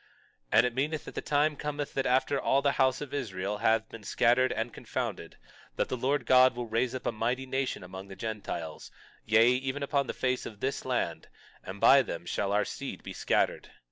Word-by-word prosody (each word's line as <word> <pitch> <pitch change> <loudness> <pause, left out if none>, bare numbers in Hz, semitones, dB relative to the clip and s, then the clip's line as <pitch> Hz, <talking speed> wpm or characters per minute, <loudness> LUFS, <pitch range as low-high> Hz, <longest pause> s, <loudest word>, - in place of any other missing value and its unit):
22:7 - - -30 0.5
And 120 - +7
it 125 - -1
meaneth 145 +5 -1
that - - -8
the - - -3
time 150 +1 +1
cometh 145 -1 -4
that 135 - 0
after 130 +2 +2
all 140 +1 +2
the 140 - +3
house 130 -1 +2
of 145 -2 -7
Israel 105 -6 -3
have 110 0 +2
been 115 - -10
scattered 125 +5 +3
and 115 +1 -3
confounded, - - -5 0.4
that - - -1
the - - -1
Lord 130 +1 0
God 130 0 +6
will 120 0 -3
raise 115 +3 0
up 125 - -6
a - - +1
mighty 120 +4 -1
nation 130 -5 -2
among 95 +2 -9
the 95 - -10
Gentiles, 100 -8 -5 0.4
yea, 110 +2 +5
even 130 +2 -1
upon 140 -1 0
the - - -4
face 130 0 -1
of 105 - -11
this 135 +4 -2
land; - - -2 0.4
and 95 +2 -8
by 135 +5 +7
them 85 -8 -6
shall 100 +3 -1
our 105 +1 +2
seed - - -6
be - - -7
scattered. - - 0
125 Hz, 210 wpm, -29 LUFS, 110-135 Hz, 0.5 s, And